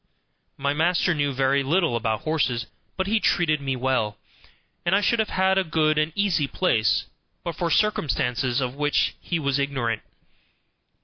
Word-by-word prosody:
My 140 +1 0
master 175 +3 +2
knew 145 -2 0
very 135 +1 +2
little 160 0 +1
about 110 -2 -1
horses, 135 -7 0 0.3
but 190 - 0
he 215 +3 +1
treated 155 -7 +1
me 135 -1 -2
well, 125 -5 -1 0.7
and 175 +2 +2
I 200 - +3
should 235 +2 +1
have 220 - +1
had 190 0 +2
a - - +1
good 155 -2 +1
and 155 +1 0
easy 190 -8 +1
place 115 - +1 0.4
but 170 -2 -4
for 170 +2 -1
circumstances 135 - +1
of 125 -1 -2
which 145 +1 +1
he 170 - -2
was 140 -3 0
ignorant. 130 -6 -1
145 Hz, 165 wpm, -24 LUFS, 130-175 Hz, 0.7 s, I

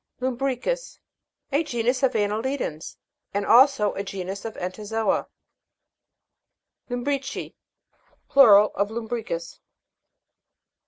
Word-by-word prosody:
LUM'BRICUS. 260 - -2 0.5
A 285 +4 +2
genus 250 -2 -1
of 265 -1 +2
annelidans, 215 - -2 0.4
and 200 0 0
also 240 -2 +5
a - - -3
genus 195 0 -6
of 225 - -5
entozo'a. 210 +4 -2 1.6
LUM'BRICI. 265 +2 -3 0.7
Plural 210 -6 +7
of 200 +1 0
Lum'bricus. 220 -7 -5
230 Hz, 85 wpm, -24 LUFS, 205-265 Hz, 1.6 s, Plural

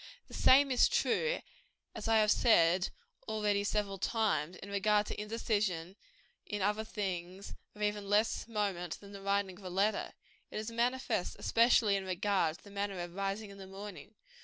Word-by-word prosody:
The - - -13
same 275 +1 +5
is 250 - +5
true, 480 +1 +1 0.5
as - - -5
I 225 0 +4
have 215 -1 +4
said 180 -5 +4 0.4
already 210 -2 0
several 205 -2 -1
times, 185 -7 0
in 200 - -10
regard 210 +1 +2
to - - -5
indecision 210 -5 -1 0.5
in 205 -3 -3
other 210 +2 +1
things 190 -3 -5 0.2
of 210 - -5
even 210 -1 -1
less 210 +3 +2
moment 200 -6 -2
than 200 -1 -13
the 200 -1 -9
writing 200 -1 -1
of - - -15
a 185 - -5
letter. 200 +4 0 0.4
It - - -6
is 215 +2 -4
manifest 240 -4 0
especially 230 -3 +4
in 190 - -5
regard 185 -3 0
to - - -24
the 200 - -13
matter 200 -1 -3
of 175 0 -5
rising 195 +2 -3
in 200 - -12
the 190 - -9
morning. 200 +2 -9
205 Hz, 175 wpm, -33 LUFS, 190-215 Hz, 0.5 s, same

